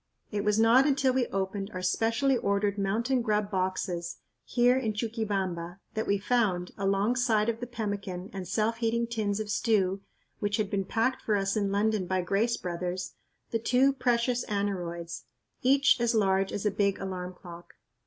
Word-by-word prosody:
It 205 -1 -1
was 210 +1 +2
not 235 +5 +6
until 270 -2 +2
we 255 -2 +1
opened 195 +1 -3
our 185 - -4
specially 230 +8 +2
ordered 200 -2 0
"mountain 230 +6 +1
grub" 210 -2 0
boxes 185 -2 -2 0.3
here 245 - +3
in 235 -5 0
Chuquibamba 195 -6 -2 0.2
that 220 - -2
we 200 - +2
found, 195 -5 0
alongside 215 +3 +1
of 230 -1 -2
the 245 - -5
pemmican 200 -5 -4
and 190 -2 -5
self 220 +4 0
heating 235 0 0
tins 215 -3 -2
of 215 -1 -3
stew 195 -4 +1 0.4
which 205 0 0
had 210 -2 -1
been 195 -2 0
packed 230 +6 0
for 215 - +1
us 195 -1 0
in 200 -2 0
London 205 -1 +1
by 185 0 +1
Grace 205 +6 +1
Brothers, 180 +1 -4 0.4
the 230 - 0
two 255 +4 +3
precious 245 -1 +1
aneroids, 175 -5 -3 0.4
each 275 0 +4
as 235 0 +2
large 195 -2 +2
as 205 - -4
a 210 - +3
big 200 -1 +1
alarm 185 -1 -5
clock. 175 -1 -12
205 Hz, 170 wpm, -29 LUFS, 190-230 Hz, 0.4 s, not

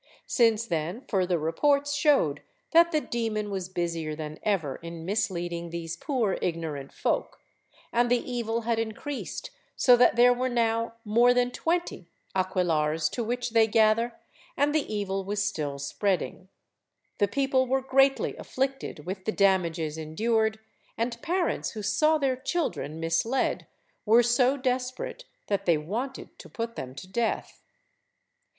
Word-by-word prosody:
Since 230 -2 +3
then 170 +4 -2
further 185 -4 +1
reports 280 - +1
showed 280 - +3 0.3
that 340 +1 +6
the 305 -2 +2
demon 220 -4 -2
was 190 -2 -3
busier 165 -4 -2
than 155 0 -7
ever 165 -11 0
in 165 -1 -8
misleading 175 -4 -2
these 165 -1 -5
poor 245 -9 -1
ignorant 160 -5 -3
folk, - - -2 0.5
and 240 +1 +3
the 245 - +4
evil 235 -2 -2
had 230 0 0
increased 245 - -5 0.2
so 250 -2 +6
that 245 - +5
there 245 +1 +6 0.2
now 230 -2 +1
were 230 - -8
more 235 +4 +5
than 245 0 +2
twenty 330 - -2 0.3
aquelarres 165 -5 +1
to 235 - -3
which 245 +1 -2
they 225 -1 +5
gather, 225 +2 +2 0.4
and 290 +1 +2
the 310 -6 0
evil 195 -2 -2
was 205 +1 -1
still 150 -8 -3
spreading; 185 +5 -2 0.7
the 205 - +4
people 265 +3 +1
were 265 +1 +1
greatly 270 +1 +3
afflicted 270 - -3
with 190 +1 -5
the 220 - +1
damages 170 -6 +1
endured, 220 +8 0 0.4
and 235 +1 -2
parents 350 +1 -1
who 215 -2 -6
saw 305 +9 +3
their 270 -3 +1
children 260 - -2
misled 165 +11 0 0.4
were 230 +3 +6
so 250 +3 +3
desperate 260 - -3 0.2
that 200 -2 -2
they 170 -2 +5
wanted 225 - -5
to - - -11
put 230 0 -4
them 130 0 -6
to 135 - -8
death. 230 +4 -2
220 Hz, 145 wpm, -27 LUFS, 175-250 Hz, 0.7 s, that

